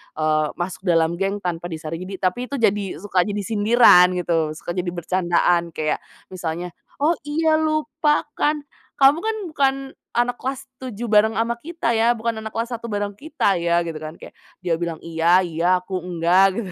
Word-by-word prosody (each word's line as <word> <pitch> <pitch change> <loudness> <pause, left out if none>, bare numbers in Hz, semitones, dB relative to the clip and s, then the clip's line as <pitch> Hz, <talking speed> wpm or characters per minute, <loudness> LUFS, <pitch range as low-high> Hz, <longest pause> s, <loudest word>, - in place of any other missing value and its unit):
eee, 155 0 +1
masuk 185 +2 -5
dalam 165 0 +2
geng 195 +1 -1
tanpa 175 -1 -3
disaring. 165 +2 -6
Jadi 195 - -6
tapi 185 +5 0
itu 280 - -4
jadi 205 -2 +2 0.2
suka 195 -3 0
jadi 205 0 -2
sindiran 210 -3 +6
gitu, 165 -3 0
suka 165 - -6
jadi 180 0 -3
bercandaan 175 -1 +1
kayak 155 -1 -1 0.3
misalnya, 175 -1 -4 0.3
"Oh, 315 - +5 0.2
iya 315 +1 +2
lupa 310 -1 +1 0.2
kan 300 0 +1 0.3
kamu 275 +3 +5
kan 445 +4 -2 0.2
bukan 275 -3 +2 0.4
anak 245 +1 +1
kelas 270 +1 -4 0.2
tujuh 240 -3 -6
bareng 220 +1 +4
sama 235 +1 -1
kita 320 -5 -2
ya, 230 +1 +3
bukan 225 0 -3
anak 220 0 -8
kelas 230 +2 -2
satu 235 0 -5
bareng 205 -2 -2
kita 285 - 0
ya," 170 0 +2
gitu 165 -2 -5
kan 155 +1 -7
kayak - - -12 0.3
dia 170 -2 +1
bilang, 170 -2 -2
"Iya 170 +3 +3
iya, 170 0 -1 0.2
aku 185 0 -3
enggak," 180 +2 +3
gitu. 185 - -8
195 Hz, 180 wpm, -22 LUFS, 170-240 Hz, 0.4 s, sindiran